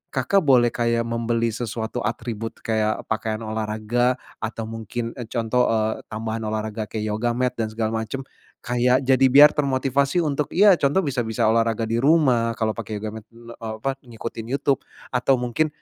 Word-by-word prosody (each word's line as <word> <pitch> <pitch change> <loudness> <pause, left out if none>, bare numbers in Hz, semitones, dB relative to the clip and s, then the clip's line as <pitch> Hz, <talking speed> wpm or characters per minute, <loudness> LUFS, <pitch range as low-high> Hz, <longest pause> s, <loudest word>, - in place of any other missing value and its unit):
Kakak 135 +10 +2
boleh 120 -3 +5
kayak 115 0 0
membeli 115 0 -1
sesuatu 115 +1 -4
atribut, 115 -2 -4
kayak 110 -1 0
pakaian 110 0 -2
olahraga, 110 +3 0 0.2
atau 110 0 -4
mungkin, 115 +1 -5
e 120 - -7
contoh, 115 +2 +1
eee, 110 -1 0
tambahan 110 +1 -4
olahraga 110 0 -3
kayak 110 -1 -3
yoga 115 +3 0
mat 125 0 +1
dan 110 - 0
segala 110 0 -2
macam, 135 +5 -5 0.4
kayak 125 +2 +2
jadi 130 0 +4
biar 145 +3 +8
termotivasi 140 +3 +1
untuk, 145 -2 -1
ya 200 +1 +7
contoh 145 +8 +2
bisa 140 -5 -2
bisa 110 - 0
olahraga 115 0 +1
di 115 +1 0
rumah. 130 -6 +3
Kalau 110 -1 +1
pakai 110 -1 -6
yoga 110 +1 -5
mat, - - -30
eee, 115 0 -13 0.2
apa, 135 +3 -2
ngikutin 115 -1 -7
YouTube, 140 -1 +1 0.3
atau 130 +1 +2
mungkin, 125 +6 0
115 Hz, 165 wpm, -23 LUFS, 110-130 Hz, 0.4 s, biar